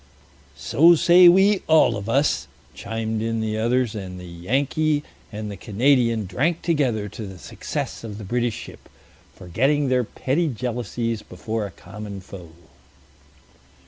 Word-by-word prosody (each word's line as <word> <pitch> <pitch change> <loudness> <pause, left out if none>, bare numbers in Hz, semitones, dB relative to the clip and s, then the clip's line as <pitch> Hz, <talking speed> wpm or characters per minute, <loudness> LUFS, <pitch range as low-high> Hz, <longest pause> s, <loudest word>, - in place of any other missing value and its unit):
"So 165 - +5
say 175 +2 +7
we 195 +2 +4
all 160 -1 +5
of 100 +2 -5
us," 140 +5 +1 0.3
chimed 110 0 -4
in 115 0 -1
the 110 0 -2
others, 120 0 +1
and 95 -4 -7
the 90 - -9
Yankee 140 - -1 0.3
and 105 -1 -5
the - - -6
Canadian 115 +1 +1
drank 150 - -1
together 130 -11 0
to 105 +1 -7
the 95 -1 -10
success - - -5
of 105 -3 -7
the 105 - -8
British 120 +2 -1
ship, - - -11 0.5
forgetting 135 - 0
their 125 -1 +2
petty 140 +8 -1
jealousies 120 -3 -3
before 110 +3 -4
a - - -15
common 100 +2 -8
foe. 90 -2 -11
115 Hz, 145 wpm, -23 LUFS, 105-140 Hz, 0.5 s, say